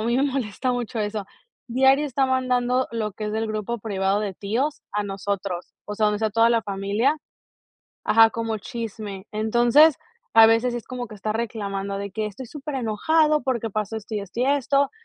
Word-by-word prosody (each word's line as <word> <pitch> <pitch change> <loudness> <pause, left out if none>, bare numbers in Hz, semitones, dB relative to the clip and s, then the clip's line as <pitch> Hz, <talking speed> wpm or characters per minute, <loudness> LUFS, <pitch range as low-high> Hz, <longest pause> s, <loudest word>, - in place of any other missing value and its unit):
a 220 - -2
mí 235 - +2
me 265 - +2
molesta 255 -2 -1
mucho 245 -1 -3
eso. 210 -1 -2 0.4
Diario 265 +4 +4
está 270 0 +1
mandando 255 -1 +1
lo 215 -3 -2
que 215 +2 -6
es 210 - -3
del 220 0 -1
grupo 215 +2 -3
privado 195 -1 0
de 200 -3 -3
tíos 240 +11 -2
a 210 - 0
nosotros, 195 -2 -4
o 210 - -4
sea, 215 0 +2
donde 210 - +1
está 220 +1 0
toda 230 +2 +4
la 230 -2 +2
familia 200 +8 0 0.9
ajá, 225 0 +6
como 225 -1 -3
chisme. 215 -4 -6
Entonces, 240 +8 +5 0.4
a 225 0 +9
veces 230 +2 +3
es 240 - -4
como 250 -1 -5
que 215 - -11
está 215 +1 -3
reclamando 200 -3 -3
de 200 0 -5
que 215 +2 -2
estoy 215 +5 -8
superenojado 300 +3 +1
porque 235 -4 -1
pasó 215 +1 -3
esto 220 +1 -7
y 205 - -1
esto 200 +5 -6
y - - +3
esto. 280 0 +2
225 Hz, 190 wpm, -24 LUFS, 210-250 Hz, 0.9 s, a